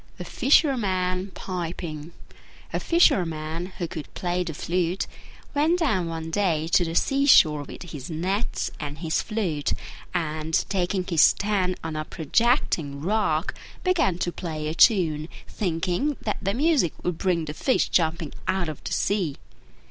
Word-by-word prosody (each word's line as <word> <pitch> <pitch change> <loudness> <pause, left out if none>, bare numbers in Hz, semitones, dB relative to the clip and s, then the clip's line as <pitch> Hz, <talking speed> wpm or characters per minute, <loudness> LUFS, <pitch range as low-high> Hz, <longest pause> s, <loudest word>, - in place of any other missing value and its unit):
THE - - -6
FISHERMAN 195 - +2
PIPING 170 -3 -5 0.6
A - - 0
Fisherman 165 - +2
who 175 - -2
could 160 -3 -7
play 180 0 -1
the 165 -4 -5
flute 175 +2 -1 0.5
went 310 +5 +3
down 215 - +1
one 165 0 -5
day 160 -4 +1
to 175 - +4
the 165 -1 -3
sea 275 +6 +2
shore 155 - +6
with 145 - -9
his 150 -5 -8
nets 185 +7 -2
and 145 0 -5
his 160 0 0
flute; 185 -10 -1 0.4
and, 160 -2 -2
taking 185 -1 0
his 165 -4 +3
stand 195 -3 +3
on 160 -1 -4
a 155 - -2
projecting 160 - +1
rock, 180 -2 0 0.3
began 340 - +2
to 175 0 -1
play 155 -4 -4
a 155 - -2
tune, 165 -6 +4 0.2
thinking 180 - -1
that 210 - -2
the 195 +1 -1
music 280 - +2
would 180 -2 -2
bring 175 -4 +1
the 150 - -5
fish 260 - +1
jumping 160 -2 +1
out 190 -4 0
of 155 - -8
the - - -3
sea. 185 -8 0
175 Hz, 150 wpm, -25 LUFS, 160-200 Hz, 0.6 s, shore